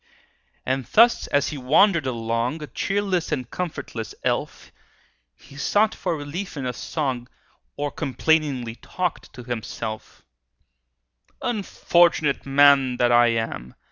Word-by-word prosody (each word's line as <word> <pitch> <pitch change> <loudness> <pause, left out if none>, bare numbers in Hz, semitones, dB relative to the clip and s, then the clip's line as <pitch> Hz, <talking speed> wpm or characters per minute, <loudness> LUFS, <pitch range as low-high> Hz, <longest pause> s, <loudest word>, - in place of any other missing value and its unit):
And 130 -1 -1
thus 235 +2 +4
as 145 - +1
he 150 - -6
wandered 155 +4 +3
along, 115 +4 -2
A - - -4
cheerless 195 0 -1
and 130 -5 -2
comfortless 140 - -5
elf, - - -2 0.6
He 140 - -16
sought 210 +9 +2
for 175 -3 -2
relief 150 +5 -6
in 135 - -4
a 125 - -2
song, 130 -6 -3 0.5
Or 145 0 -2
complainingly 140 -4 0
talked 180 -2 -4
to 125 - -10
himself:— 115 -2 -6 1.2
"Unfortunate 175 - +1
man 135 -2 +5
that 120 0 +3
I 120 0 +6
am! 115 - -3
140 Hz, 120 wpm, -23 LUFS, 125-165 Hz, 1.2 s, I